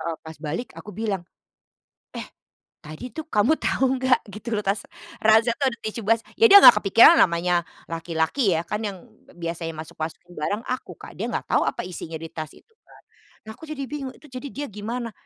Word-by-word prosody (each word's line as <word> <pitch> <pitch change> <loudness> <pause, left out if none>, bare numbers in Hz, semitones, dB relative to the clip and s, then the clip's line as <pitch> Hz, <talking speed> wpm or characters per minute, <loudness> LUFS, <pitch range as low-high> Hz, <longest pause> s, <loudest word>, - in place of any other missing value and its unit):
Heeh, 165 -1 -3
pas 160 0 -10
balik 160 +10 -4
aku 210 - -10
bilang, 205 -5 -2 0.9
eh - - -4 0.6
tadi 155 +12 -9
tuh 315 +3 -7
kamu 215 +6 +3
tahu 270 - 0 0.2
enggak 260 -1 +3
gitu 215 +3 -7
loh, 210 - -2
tas 195 +2 0 0.4
ransel 220 +2 +5
tuh 275 - +2
ada 235 - -9
tisu 220 +1 -4
bas 225 0 +3 0.2
ya 455 - +8
dia 405 - +11
nggak - - +10
kepikiran 230 - +7
namanya 175 0 +2 0.3
laki-laki 165 - 0
ya. 160 - -1
Kan 210 +4 -4
yang 190 -3 -8 0.3
biasanya 165 -1 -5
masuk-masukin 160 +2 -7
barang 205 +9 -2
aku 255 +1 -5
Kak, - - -11
dia - - -4
nggak - - -3
tahu - - +4
apa - - -2
isinya 165 -2 -7
di 165 +1 -8
tas 155 -1 -7
itu 450 - -22 0.2
kan. - - -19 0.5
Nah, - - -6
aku 245 - -19
jadi 300 -3 -5
bingung, 275 -2 -5
itu 300 - -17
jadi 255 +2 -6
dia 290 +1 -5
gimana? 230 +4 -5
210 Hz, 195 wpm, -24 LUFS, 165-250 Hz, 0.9 s, dia